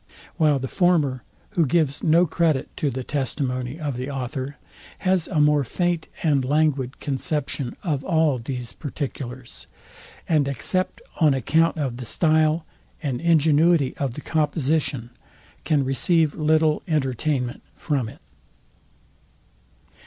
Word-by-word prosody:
While 155 -4 +4
the 135 0 -3
former, 155 -7 +2 0.3
who 180 -6 +2
gives 145 -1 +1
no 170 +2 +4
credit 160 -4 0
to 145 - 0
the 130 0 -4
testimony 130 0 -2
of 145 -5 -3
the 130 +2 -4
author, 135 +1 -4 0.4
has 185 -3 +1
a 160 - 0
more 150 -1 +4
faint 175 +5 -1 0.2
and 145 -5 +3
languid 140 -2 +1
conception 140 -2 -2
of 150 -7 -1
all 160 -6 +2
these 125 0 -5
particulars; 130 -4 -6 0.6
and 150 -4 +2
except 185 +7 -2 0.2
on 150 -5 +5
account 160 +7 +2
of 135 -6 -2
the 125 - -6
style 155 +4 +2 0.4
and 130 -5 -2
ingenuity 160 -2 +3
of 135 -4 -2
the - - -6
composition, 145 -5 0 0.5
can 150 -4 +2
receive 155 +3 +2
little 155 0 +2
entertainment 135 -3 -1
from 135 -8 -1
it. 140 - -15
145 Hz, 125 wpm, -23 LUFS, 130-160 Hz, 0.6 s, on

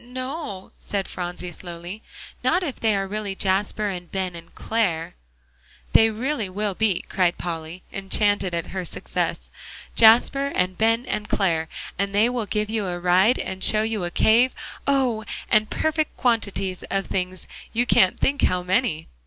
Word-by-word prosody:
"N 245 +1 -16
no," 255 - -5
said 200 -2 -3
Phronsie, 180 0 -5
slowly, 175 +4 -8 0.4
"not 365 - +2
if 285 -7 -4
they 220 -2 +2
are 195 0 0
really 205 -1 -4
Jasper 200 +2 0
and 180 -2 -6
Ben 185 -2 -2
and 170 0 -12
Clare." 180 -8 -1 0.8
"They 225 - +7
really 230 -1 -2
will 205 +2 -2
be," 205 -2 +1
cried 180 -2 +1
Polly, 165 +1 -5
enchanted 195 -1 +1
at 170 - -2
her 190 -1 -2
success, - - -3 0.4
"Jasper 240 +5 +6
and 185 0 +1
Ben 225 +4 +2
and 210 -4 -3
Clare; 165 -5 +1 0.3
and 200 0 -1
they 215 +4 +5
will 240 -4 -2
give 210 0 -1
you 215 -2 -2
a 175 -1 -3
ride, 185 +7 +4
and 190 0 -4
show 215 0 +5
you 220 -3 -2
a 175 - -1
cave, 230 +8 +4 0.3
oh! 260 -6 +2 0.3
and 215 -1 +4
perfect 315 -1 -1
quantities 200 -6 0
of 195 0 0
things; 185 0 -3 0.2
you 240 +2 +1
can't 190 -5 +4
think 285 +1 +1
how 180 0 +2
many!" 185 -4 0
200 Hz, 165 wpm, -24 LUFS, 180-225 Hz, 0.8 s, They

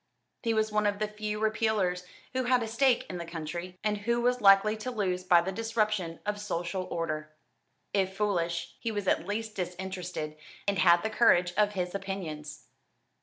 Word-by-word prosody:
He 230 -2 0
was 220 0 +1
one 210 0 +2
of 205 0 0
the 215 +1 -1
few 210 0 -4
Repealers 215 -5 +1 0.3
who 260 -1 0
had 250 -1 +3
a - - -3
stake 245 +2 +3
in 180 - -5
the - - -3
country, 170 +2 -6
and 210 -1 0
who 235 +3 0
was 245 +1 +1
likely 200 +1 +6
to 220 +4 -4
lose 190 -6 -1
by 175 -2 +6
the 185 +3 -3
disruption 215 -5 -1
of 205 0 -2
social 180 -2 -2
order. 155 -2 -3 0.6
If 190 -1 0
foolish, 170 -5 -1
he 230 - -2
was 205 -3 -3
at 175 - +1
least 215 +1 -3
disinterested, 180 -4 -4 0.3
and 200 -1 +1
had 170 -1 +6
the 220 - -1
courage 180 -6 +4
of 210 0 +3
his 180 -2 -2
opinions. 180 -7 -5
195 Hz, 180 wpm, -29 LUFS, 180-215 Hz, 0.6 s, likely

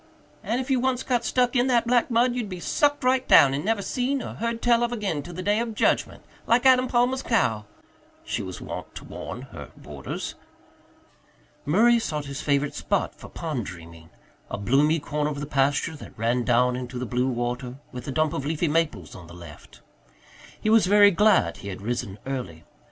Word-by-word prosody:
"And 235 - -1
if 260 +1 -3
you 260 - +3
once 255 0 0
got 245 -2 0
stuck 250 +1 +1
in 245 +1 +3
that 240 -2 +2
black 245 +1 +2
mud 240 +1 +3
you'd 240 -4 -3
be 185 -2 -6
sucked 290 - +1
right 255 0 +2
down 135 -1 +7
and 140 - -2
never 210 0 0
seen 260 +3 -1
or - - -6
heard 230 +1 -3
tell 235 0 +3
of 240 0 0
again 200 -10 -2
till 175 +3 -10
the 185 - -5
day 205 +3 +2
of 230 -2 -3
judgment, - - 0 0.2
like 240 +3 +3
Adam 255 -1 +5
Palmer's 250 +2 +1
cow," 110 - 0 0.6
she - - -2
was 95 -1 -7
wont - - -8
to - - -8
warn - - -7
her - - -10
boarders. 70 -1 -6 1.3
Murray 230 +9 +4
sought 150 -9 -3
his 140 0 -6
favourite 140 0 0
spot - - -1
for - - -13
pond 150 -10 -4
dreaming 85 -2 -11 0.4
a - - -4
bloomy 140 +10 +2
corner 150 +1 -2
of 145 -1 -5
the 145 - -4
pasture 140 +3 0
that 145 - -12
ran 120 +3 0
down 125 +1 +2
into 125 0 -6
the 125 - -3
blue 125 +2 0
water, 125 0 -3 0.2
with 125 -2 -8
a - - -2
dump 155 +2 +1
of 140 - -3
leafy 160 +3 -1
maples 150 - -1
on 90 -3 -11
the 85 - -12
left. 85 -4 -13 0.8
He 215 - 0
was 220 -4 +5
very 205 +1 +7
glad 185 - +3
he - - -9
had 95 - -6
risen 110 -4 -3
early. 125 -12 -5
155 Hz, 200 wpm, -25 LUFS, -, 1.3 s, down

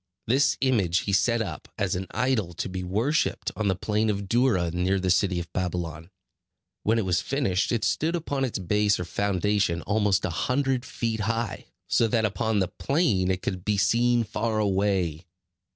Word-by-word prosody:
This 135 +4 +2
image 100 -10 +2
he 100 - -3
set 115 +3 +2
up, 85 -7 -7
as 100 -1 0
an 95 +1 -4
idol 110 -10 0
to - - -3
be 95 0 -4
worshipped, 110 - 0
on 110 - -1
the 95 - +2
plain 105 +3 0
of 100 -1 -2
Dura, 115 -7 +2
near 90 +3 +1
the 90 -1 +1
city 95 -1 +2
of 85 - -8
Babylon. 85 -3 -3 0.7
When 110 +2 +2
it 110 - 0
was 90 -3 +1
finished, 120 -9 0
it 115 -3 0
stood 160 +9 +1
upon 145 -5 -2
its 130 - -1
base 105 +2 +1
or 90 - -3
foundation 100 -1 0
almost 105 -1 +1
a - - -2
hundred 130 - 0
feet 115 -3 -3
high; 115 +1 -2 0.2
so 115 - +3
that 110 0 +1
upon 105 +1 0
the 95 -2 +2
plain 115 - 0
it 95 -1 -1
could 90 -2 -3
be 105 0 0
seen 120 +4 +3
far 110 0 -2
away. 95 -5 0
105 Hz, 185 wpm, -26 LUFS, 95-115 Hz, 0.7 s, so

